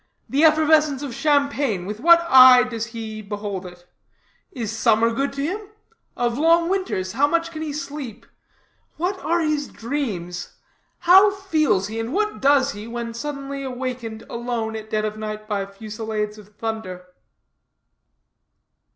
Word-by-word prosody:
The 285 Hz, +3 st, +1 dB
effervescence 310 Hz, -2 st, +4 dB
of 275 Hz, -4 st, -5 dB
champagne, 280 Hz, -, +1 dB
with 210 Hz, +2 st, -5 dB
what 340 Hz, +4 st, +6 dB
eye 255 Hz, -3 st, +9 dB
does 230 Hz, -2 st, -4 dB
he 220 Hz, -2 st, -7 dB
behold 205 Hz, -2 st, -5 dB
it? 175 Hz, 0 st, -14 dB, 0.7 s
Is 225 Hz, -, -4 dB
summer 230 Hz, 0 st, +3 dB
good 275 Hz, +4 st, -1 dB
to 275 Hz, 0 st, -3 dB
him? 375 Hz, +7 st, -2 dB, 0.6 s
Of 240 Hz, +1 st, -1 dB
long 335 Hz, +2 st, +4 dB
winters 370 Hz, -, -2 dB
how 275 Hz, +7 st, +2 dB
much 335 Hz, +2 st, 0 dB
can 315 Hz, -1 st, -7 dB
he 310 Hz, -2 st, -3 dB
sleep? 285 Hz, -6 st, -7 dB, 0.7 s
What 370 Hz, +4 st, -2 dB
are 340 Hz, 0 st, 0 dB
his 305 Hz, -2 st, 0 dB
dreams? 205 Hz, -9 st, -5 dB, 0.4 s
How 380 Hz, +4 st, +7 dB
feels 315 Hz, -, 0 dB
he, 220 Hz, +2 st, -5 dB
and 225 Hz, +4 st, -4 dB
what 425 Hz, +2 st, -1 dB
does 275 Hz, 0 st, +4 dB
he, 205 Hz, +2 st, -8 dB
when 235 Hz, 0 st, -5 dB
suddenly 275 Hz, +2 st, -5 dB
awakened, 250 Hz, -4 st, -5 dB
alone, 235 Hz, -2 st, -3 dB
at 220 Hz, 0 st, -7 dB
dead 215 Hz, 0 st, 0 dB
of 215 Hz, 0 st, -4 dB
night, 215 Hz, 0 st, -6 dB
by 200 Hz, -2 st, -2 dB
fusilades 215 Hz, +1 st, -5 dB
of 210 Hz, 0 st, -17 dB
thunder?" 210 Hz, -5 st, -5 dB
245 Hz, 150 wpm, -22 LUFS, 215-295 Hz, 0.7 s, eye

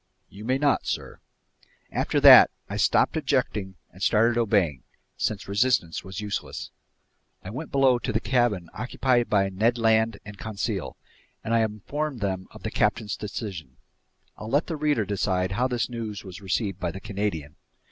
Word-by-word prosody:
"You 105 Hz, +2 st, -11 dB
may 130 Hz, +2 st, +1 dB
not, 145 Hz, -1 st, +1 dB
sir." -, -, -4 dB, 0.7 s
After -, -, 0 dB
that, -, -, +10 dB, 0.2 s
I -, -, -5 dB
stopped -, -, +2 dB
objecting 95 Hz, -3 st, -1 dB, 0.2 s
and 90 Hz, -, -16 dB
started 115 Hz, +4 st, +3 dB
obeying, 100 Hz, -, +1 dB, 0.3 s
since 105 Hz, -2 st, -2 dB
resistance 100 Hz, -5 st, +1 dB
was 95 Hz, +1 st, -6 dB
useless. 105 Hz, -1 st, -5 dB, 0.7 s
I 95 Hz, -, -7 dB
went 145 Hz, +7 st, -6 dB
below 135 Hz, -3 st, +4 dB
to 125 Hz, -, -3 dB
the 110 Hz, -, +1 dB
cabin 120 Hz, -9 st, +1 dB
occupied 125 Hz, -1 st, 0 dB
by 100 Hz, -2 st, +2 dB
Ned 110 Hz, +6 st, +1 dB
Land 110 Hz, -1 st, +2 dB
and 105 Hz, -1 st, -10 dB
Conseil, 105 Hz, -2 st, -4 dB, 0.5 s
and 115 Hz, -, -2 dB
I 115 Hz, -, +4 dB
informed 120 Hz, +6 st, -2 dB
them 95 Hz, -2 st, -2 dB
of -, -, -14 dB
the -, -, -3 dB
captain's 110 Hz, -3 st, 0 dB
decision. 95 Hz, -, -6 dB, 0.6 s
I'll 110 Hz, -, -7 dB
let 145 Hz, +6 st, +2 dB
the 165 Hz, -, -4 dB
reader 145 Hz, -7 st, +1 dB
decide 95 Hz, -2 st, -1 dB
how 120 Hz, +6 st, +1 dB
this 125 Hz, -2 st, -1 dB
news 115 Hz, -4 st, -6 dB
was 95 Hz, +1 st, -10 dB
received 100 Hz, +1 st, -2 dB
by 90 Hz, -, -1 dB
the 95 Hz, -, -7 dB
Canadian. 95 Hz, -8 st, -4 dB
105 Hz, 165 wpm, -26 LUFS, 95-120 Hz, 0.7 s, that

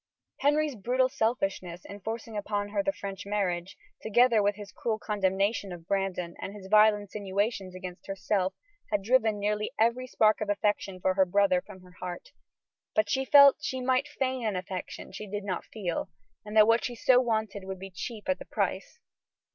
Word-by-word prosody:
Henry's 295 Hz, +1 st, +2 dB
brutal 250 Hz, +4 st, +1 dB
selfishness 195 Hz, -7 st, -2 dB
in 200 Hz, -, -9 dB
forcing 225 Hz, +2 st, -5 dB
upon 205 Hz, 0 st, -2 dB
her 300 Hz, -, 0 dB
the 295 Hz, 0 st, 0 dB
French 195 Hz, -7 st, -7 dB
marriage, 190 Hz, -3 st, -2 dB, 0.2 s
together 235 Hz, 0 st, +4 dB
with 205 Hz, 0 st, +2 dB
his 205 Hz, -1 st, -10 dB
cruel 225 Hz, -2 st, -2 dB
condemnation 200 Hz, -1 st, 0 dB
of 170 Hz, -2 st, -9 dB
Brandon, 195 Hz, -3 st, -1 dB
and 195 Hz, -, -6 dB
his 200 Hz, -2 st, -10 dB
vile 215 Hz, 0 st, +7 dB
insinuations 200 Hz, -1 st, -3 dB
against 185 Hz, 0 st, -8 dB
herself, 195 Hz, -1 st, -1 dB, 0.3 s
had 205 Hz, -2 st, 0 dB
driven 220 Hz, -1 st, +3 dB
nearly 210 Hz, +1 st, -1 dB
every 235 Hz, +3 st, +2 dB
spark 215 Hz, -3 st, +3 dB
of 210 Hz, -, -2 dB
affection 205 Hz, -2 st, 0 dB
for 185 Hz, +1 st, +1 dB
her 190 Hz, 0 st, +4 dB
brother 190 Hz, -1 st, +3 dB
from 190 Hz, -2 st, -13 dB
her 180 Hz, 0 st, -17 dB
heart. 180 Hz, -, -6 dB, 0.7 s
But 215 Hz, -1 st, +2 dB
she 265 Hz, 0 st, +1 dB
felt 280 Hz, 0 st, +8 dB
that 300 Hz, -, -24 dB
she 260 Hz, -, -2 dB
might 255 Hz, +1 st, +1 dB
feign 260 Hz, -2 st, -2 dB
an 215 Hz, -3 st, 0 dB
affection 185 Hz, 0 st, -6 dB
she 210 Hz, -, -7 dB
did 205 Hz, +1 st, -4 dB
not 185 Hz, -3 st, -3 dB
feel, 185 Hz, -6 st, -4 dB, 0.3 s
and 210 Hz, +1 st, -4 dB
that 215 Hz, -, +9 dB
what 230 Hz, +1 st, +3 dB
she 245 Hz, -, -3 dB
so 250 Hz, +1 st, +5 dB
wanted 220 Hz, -5 st, -2 dB
would 190 Hz, 0 st, -5 dB
be 195 Hz, +1 st, -9 dB
cheap 215 Hz, +3 st, -7 dB
at 280 Hz, -, +1 dB
the -, -, -9 dB
price. -, -, -2 dB
205 Hz, 185 wpm, -29 LUFS, 190-230 Hz, 0.7 s, that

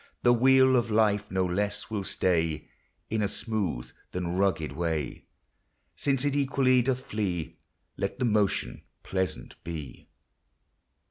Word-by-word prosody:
The 120 Hz, -, +6 dB
wheel 130 Hz, +2 st, +5 dB
of 120 Hz, -2 st, +2 dB
life 105 Hz, -1 st, +2 dB
no 95 Hz, 0 st, +1 dB
less 100 Hz, +4 st, -2 dB
will 105 Hz, -3 st, -1 dB
stay 85 Hz, -5 st, 0 dB, 0.4 s
In 110 Hz, -1 st, +1 dB
a 105 Hz, -, +2 dB
smooth 95 Hz, -, -2 dB, 0.2 s
than 90 Hz, -1 st, -2 dB
rugged 95 Hz, -5 st, +1 dB
way: 80 Hz, -4 st, -3 dB, 0.7 s
Since 135 Hz, -1 st, +1 dB
it 145 Hz, -1 st, +1 dB
equally 135 Hz, -2 st, +3 dB
doth 130 Hz, +1 st, -1 dB
flee, 95 Hz, -6 st, -3 dB, 0.4 s
Let -, -, -2 dB
the 125 Hz, -, 0 dB
motion 105 Hz, -3 st, +1 dB, 0.2 s
pleasant 95 Hz, -1 st, -3 dB
be. 80 Hz, -2 st, -4 dB
LIFE. -, -, -15 dB
105 Hz, 135 wpm, -28 LUFS, 90-120 Hz, 0.7 s, The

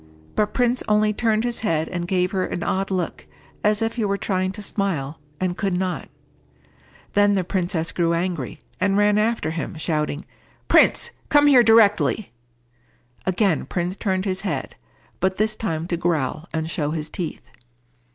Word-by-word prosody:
But 210 Hz, -1 st, 0 dB
Prince 245 Hz, 0 st, +2 dB
only 210 Hz, 0 st, +3 dB
turned 220 Hz, 0 st, +1 dB
his 240 Hz, -1 st, 0 dB
head 165 Hz, -7 st, 0 dB
and 175 Hz, -1 st, -4 dB
gave 180 Hz, 0 st, +1 dB
her 190 Hz, -2 st, 0 dB
an 175 Hz, -, -3 dB
odd 195 Hz, +1 st, -1 dB
look, 185 Hz, -3 st, -3 dB, 0.4 s
as 210 Hz, +1 st, +2 dB
if 225 Hz, +2 st, -2 dB
he 230 Hz, -, 0 dB
were 200 Hz, 0 st, 0 dB
trying 185 Hz, -2 st, -1 dB
to 210 Hz, -, -7 dB
smile, 165 Hz, -9 st, -2 dB, 0.2 s
and 185 Hz, -1 st, -1 dB
could 195 Hz, -2 st, -1 dB
not. 185 Hz, 0 st, -2 dB, 1.0 s
Then 205 Hz, 0 st, +4 dB
the 190 Hz, -2 st, +1 dB
princess 175 Hz, -2 st, -1 dB
grew 170 Hz, -1 st, +1 dB
angry, 170 Hz, -, -2 dB, 0.2 s
and 195 Hz, 0 st, +2 dB
ran 205 Hz, 0 st, +4 dB
after 220 Hz, -6 st, 0 dB
him, 165 Hz, +1 st, -4 dB
shouting, 150 Hz, -1 st, -2 dB, 0.4 s
"Prince, 475 Hz, -, +4 dB, 0.2 s
come 290 Hz, 0 st, +5 dB
here 275 Hz, -4 st, +7 dB
directly." 220 Hz, -2 st, +4 dB, 1.0 s
Again 185 Hz, -2 st, +1 dB
Prince 180 Hz, +1 st, -2 dB
turned 190 Hz, -2 st, -1 dB
his 190 Hz, -1 st, -1 dB
head, 200 Hz, -, -3 dB, 0.4 s
but 190 Hz, 0 st, 0 dB
this 215 Hz, +1 st, +1 dB
time 165 Hz, -7 st, -2 dB
to 170 Hz, -, 0 dB
growl 165 Hz, -2 st, -1 dB
and 160 Hz, 0 st, -2 dB
show 150 Hz, -3 st, -1 dB
his 155 Hz, -1 st, -3 dB
teeth. 165 Hz, 0 st, -5 dB
190 Hz, 165 wpm, -23 LUFS, 170-210 Hz, 1.0 s, here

